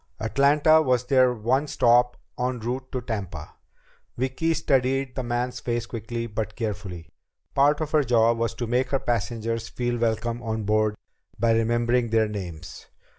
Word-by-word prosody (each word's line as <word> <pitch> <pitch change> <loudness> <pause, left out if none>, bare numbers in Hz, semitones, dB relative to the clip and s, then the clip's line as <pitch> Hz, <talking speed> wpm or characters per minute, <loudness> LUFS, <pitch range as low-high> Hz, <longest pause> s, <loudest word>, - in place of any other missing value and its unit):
Atlanta 145 +7 +4
was 125 -4 +1
their 130 -1 +4
one 125 +5 0
stop 125 -2 +3 0.2
en 125 0 -1
route 125 +3 -4
to 130 - -3
Tampa. 95 -10 -5 0.6
Vicki 130 +6 0
studied 135 -1 +1
the 130 - -3
man's 125 +1 -2
face 120 -1 -2
quickly 115 0 -5
but 110 -1 -4
carefully. 100 -8 -5 0.4
Part 145 +2 +3
of 155 -1 -3
her 155 -2 +3
job 115 -2 +3
was 115 0 -1
to 120 - -3
make 125 +3 0
her 135 - +1
passengers 115 0 -2
feel 120 -1 -2
welcome 115 +1 -1
on 110 -2 -3
board 105 0 +1 0.4
by 115 +1 +3
remembering 120 +1 +1
their 110 -1 +3
names. 85 -5 -7
120 Hz, 155 wpm, -25 LUFS, 110-130 Hz, 0.6 s, Atlanta